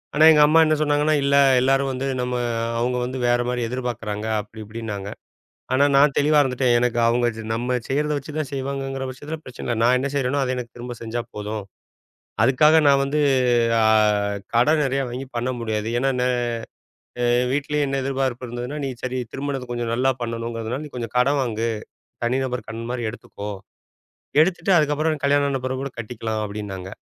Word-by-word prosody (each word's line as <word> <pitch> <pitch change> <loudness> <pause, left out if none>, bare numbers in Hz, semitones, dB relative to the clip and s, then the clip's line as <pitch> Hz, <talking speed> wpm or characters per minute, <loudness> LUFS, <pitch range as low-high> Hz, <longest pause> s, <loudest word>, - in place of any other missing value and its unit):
ஆனா 155 +1 +6
எங்க 150 -1 +5
அம்மா 155 +2 +5
என்ன 155 - +3
சொன்னாங்கன்னா, 150 0 +2
"இல்ல, 140 0 +3 0.3
எல்லாரும் 135 +1 +2
வந்து, 130 +1 -3
நம்ம 125 0 -1 0.4
அவங்க 125 +2 0
வந்து 130 +2 -4
வேற 120 0 +3
மாரி 125 0 -1
எதிர்பார்க்கிறாங்க." 115 -4 -4 0.2
அப்படி 110 +1 -14
இப்படின்னாங்க. 105 -2 -6 0.6
ஆனா 135 +2 +4
நான் 140 +1 +5
தெளிவா 150 +1 +4
இருந்துட்டேன். 125 -2 +2
எனக்கு 120 -1 +1
அவங்க 120 +1 +2
ச - - -5
நம்ம 125 +3 -1
செய்யறத 150 +2 0
வச்சு 140 +2 -7
தான் 155 -3 -2
செய்வாங்கங்கற 135 0 -3
பச்சத்துல 145 +5 -6
பிரச்சனை 130 - -9
இல்ல. 120 - 0
நான் 125 +2 +5
என்ன 130 +2 -1
செய்யறேனோ 140 0 0
அதை 130 -1 -1
எனக்குத் 125 -2 -7
திரும்பச் 120 -1 -7
செஞ்சா 115 +1 -3
போதும். 105 0 -4 0.8
அதுக்காக 150 +6 +5
நான் 140 -1 +5
வந்து 140 +2 -1 0.6
ஆ, - - +3 0.7
கடன் 150 +7 +4
நெறைய 135 0 0
வாங்கி 125 +3 -5
பண்ண 120 +2 -1
முடியாது. 110 -2 -2
ஏன்னா 135 +2 +1
ந - - +2 1.0
அ - - +2 0.3
வீட்டுல 145 +1 -1
என்ன 135 0 -1
எதிர்பார்ப்பு 130 -2 -2
இருந்ததுனா, 120 +5 -5
"நீ - - -1
சரி 130 0 -2
திருமணத்தை 135 -2 -4
கொஞ்சம் 120 -1 -2
நல்லா 130 +3 +2
பண்ணணும்ங்கறதுனால 115 +2 -4
நீ - - -11
கொஞ்சம் 115 -1 -5
கடன் 140 +3 +3
வாங்கு, 115 -2 -1 0.6
தனிநபர் 125 +1 -1
கடன் 115 +1 -6
மாரி 125 -1 -3
எடுத்துக்கோ, 105 -2 -8 0.9
எடுத்துட்டு 175 +2 +1
அதுக்கப்பறம் 155 0 +1
கல்யாணம் 140 0 +3
ஆன 135 -2 -2
பிறகு 130 +1 -4
கட்டிக்கலாம்," 110 -1 -4
அப்படின்னாங்க. 100 -3 -6
125 Hz, 170 wpm, -23 LUFS, 120-140 Hz, 1.0 s, ஆனா